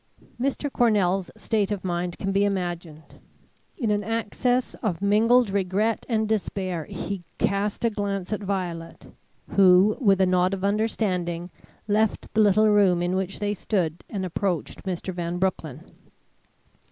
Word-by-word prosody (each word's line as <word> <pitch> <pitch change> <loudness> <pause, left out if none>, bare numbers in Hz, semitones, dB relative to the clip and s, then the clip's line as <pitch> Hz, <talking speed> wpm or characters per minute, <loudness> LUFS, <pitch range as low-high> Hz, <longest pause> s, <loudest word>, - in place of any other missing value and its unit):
Mr. 275 +1 -1
Cornell's 195 -5 +2
state 210 -3 0
of 205 -3 -3
mind 175 -1 -2
can 195 - -2
be 200 +1 +2
imagined. 175 -5 -4 0.6
In 230 -7 0
an 205 0 0
access 230 +3 -1
of 185 -7 -1
mingled 220 +3 +4
regret 200 +3 0
and 220 -2 +1
despair, 185 -6 -2
he 195 +3 -5
cast 200 +3 0
a 230 - +2
glance 200 -2 -3
at 210 - -3
Violet, 180 -4 -4 0.4
who, 190 +2 +5
with 200 -7 +3
a 190 - +5
nod 185 +1 +2
of 190 - -8
understanding, 185 -5 -1 0.4
left 215 0 0
the 220 - +4
little 215 +1 +5
room 190 -4 +4
in 175 +1 0
which 190 0 -2
they 205 0 -1
still 205 - -11 0.3
stood, 165 - -22
and 195 -3 -3
approached 180 -1 -3
Mr. 185 0 -3
Van 175 0 -3
Broecklyn. 165 -5 -2
195 Hz, 150 wpm, -25 LUFS, 180-210 Hz, 0.6 s, who